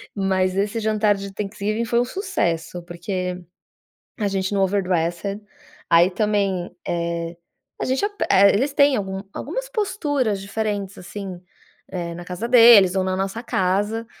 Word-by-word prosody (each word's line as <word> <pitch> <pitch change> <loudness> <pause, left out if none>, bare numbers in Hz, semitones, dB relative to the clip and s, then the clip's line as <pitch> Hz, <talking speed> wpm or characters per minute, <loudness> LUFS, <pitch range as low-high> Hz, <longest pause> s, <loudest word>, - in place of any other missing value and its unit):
Mas 190 -2 +1
esse 205 +3 0
jantar 215 -1 +2
de 195 0 -7
Thanksgiving 210 +2 -2
foi 235 +1 +1
um 245 - +2
sucesso. 180 - -2
Porque 180 +1 -4 0.8
a 210 -3 0
gente 190 0 -2
no 195 - +2
overdressed 185 0 0 0.5
aí 170 +2 +6
também, 195 -3 0
eh 170 0 -2 0.4
a - - 0
gente 260 +9 0
ape 410 0 -3
Eh, 200 +1 +7
eles 265 +8 +1
têm 280 -1 +4
algum 190 -1 -3
algumas - - -4
posturas 295 - -1
diferentes, 200 -1 -3
assim, 185 0 -7 0.5
eh, 170 -2 -4
na 175 +1 -8
casa 180 +6 -5
deles 230 -6 +8
ou 190 - +2
na 185 0 -1
nossa 195 +4 -3
casa. 205 +3 0
200 Hz, 150 wpm, -22 LUFS, 185-225 Hz, 0.8 s, deles